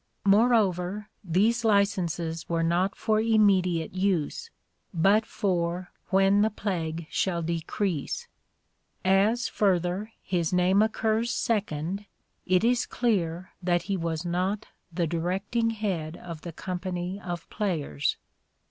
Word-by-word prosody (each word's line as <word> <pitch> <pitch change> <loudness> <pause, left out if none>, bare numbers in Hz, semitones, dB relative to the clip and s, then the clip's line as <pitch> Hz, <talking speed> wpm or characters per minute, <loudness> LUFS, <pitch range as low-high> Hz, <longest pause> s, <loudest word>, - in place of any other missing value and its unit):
Moreover, 205 -2 +3
these 210 +7 +2
licenses 175 -6 +1
were 165 -1 +1
not 175 +4 +1
for 215 -1 +1
immediate 195 -7 +3
use, 190 - -1 0.4
but 200 +5 +3
for 175 -2 -1
" - - -39
when 195 +1 +4
the 215 - +4
plague 170 -6 -3
shall 170 -3 0
decrease." 170 0 -2 0.8
As, 200 +5 +3
further, 190 +1 0
his 175 -4 0
name 180 +2 +4
occurs 220 +1 +1
second* 200 -4 -1 0.4
it 185 +2 +3
is 245 +1 +2
clear 185 -7 -1
that 175 -1 +1
he 195 +1 -1
was 165 -1 -2
not 185 +4 -1 0.2
the 170 0 0
directing 190 +8 -1
head 185 -8 -3
of 170 -3 -8
the 170 - -6
company 180 +2 -4
of 175 -2 -5
players. 155 - -1
185 Hz, 120 wpm, -27 LUFS, 170-210 Hz, 0.8 s, when